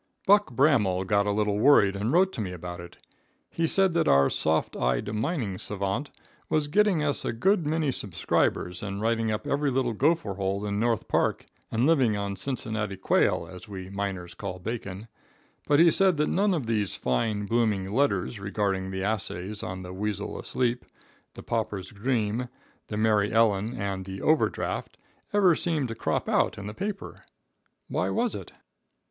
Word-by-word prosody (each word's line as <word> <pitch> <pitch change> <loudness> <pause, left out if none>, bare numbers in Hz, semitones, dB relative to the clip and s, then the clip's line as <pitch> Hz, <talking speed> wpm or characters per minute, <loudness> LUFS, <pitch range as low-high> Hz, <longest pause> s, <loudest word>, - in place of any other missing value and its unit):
Buck 205 +1 +5
Bramel 115 -10 +3
got 100 +1 +2
a - - +2
little 105 0 0
worried 105 -6 +5
and 105 +5 -1
wrote 185 +4 +3
to - - -4
me 95 -3 -3
about 90 0 -7
it. 85 0 -11 0.5
He 165 0 0
said 190 +1 +3
that 170 - +2
our 70 0 +5
soft 80 0 0
eyed 60 - 0
mining 110 - -2
savant 105 +7 -2 0.4
was 155 -1 +1
getting 190 0 +3
us 145 -2 0
a - - -1
good 165 - +1
many 155 -2 +1
subscribers, 90 -3 -1
and 100 -1 -4
writing 115 +1 0
up 105 - -3
every 145 0 +1
little 130 -2 0
gopher 145 -3 +1
hole 100 +1 -2
in 100 0 -1
North 115 -1 0
Park, - - 0 0.2
and 115 +3 +1
living 130 -9 +3
on 100 -1 -3
Cincinnati 110 -3 -3
quail, 85 -2 +2
as 90 +3 -11
we 95 -2 -8
miners 95 -3 -4
call 90 +1 -6
bacon; 105 0 -6 0.6
but 145 0 +4
he 170 0 +7
said 190 -1 +3
that 150 - +1
none 200 0 +2
of 145 -7 -2
these 105 -4 -1
fine, 105 - -1
blooming 105 -3 +1
letters, 105 -2 0
regarding 100 -1 -1
the 95 0 -3
assays 100 -1 -2
on 95 0 -5
"The 90 0 -8
Weasel 100 +1 -3
Asleep," 125 -1 -1 0.5
"The - - -9
Pauper's 105 -5 -3
Dream," 110 +1 -1 0.4
"The 105 - -4
Mary 105 -1 +2
Ellen" 110 +1 +2
and 100 -2 -3
"The 95 0 -6
Over 155 0 +4
Draft," - - -4 0.3
ever 195 -4 +5
seemed 155 -6 -1
to - - -3
crop 115 - -2
out - - +1
in 100 - -7
the 105 - -5
paper. 200 - -5 0.6
Why - - -1
was 235 0 0
it? - - -7
105 Hz, 175 wpm, -27 LUFS, 95-140 Hz, 0.6 s, he